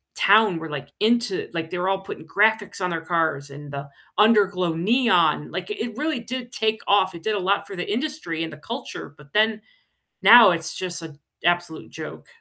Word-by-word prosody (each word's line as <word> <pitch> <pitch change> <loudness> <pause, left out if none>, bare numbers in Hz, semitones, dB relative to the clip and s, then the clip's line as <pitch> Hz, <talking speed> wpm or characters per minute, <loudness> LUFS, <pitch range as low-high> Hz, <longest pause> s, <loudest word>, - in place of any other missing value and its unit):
town 205 -2 +4
were, 165 - -6
like, 150 -2 -6
into, 230 -2 +1
like, 165 -1 -3
they 180 - -4
were 180 +1 -1
all 195 0 0
putting 195 - -9
graphics 210 +2 +1
on 180 - 0
their 165 -2 -3
cars 160 -4 -1
and 145 +1 -10
the 140 0 -6 0.3
under-glow 200 -5 +3
neon, 180 - +2
like 180 +1 -5
it 225 +1 -4
really 305 -2 -1
did 245 +1 -6
take 220 -1 -1
off. 205 - +3
It 170 - -9
did 215 -1 0
a - - -1
lot 195 +2 0
for 195 - -8
the 175 - -5
industry 245 - -3
and 165 - -5
the 155 - -10
culture, 230 - -7
but 150 -1 -18
then 215 0 +2 0.6
now 220 +1 +9
it's 165 -2 -3
just 180 -2 -4
an 155 -3 -10 0.2
absolute 175 -1 -1
joke. - - -9
185 Hz, 200 wpm, -23 LUFS, 165-220 Hz, 0.6 s, now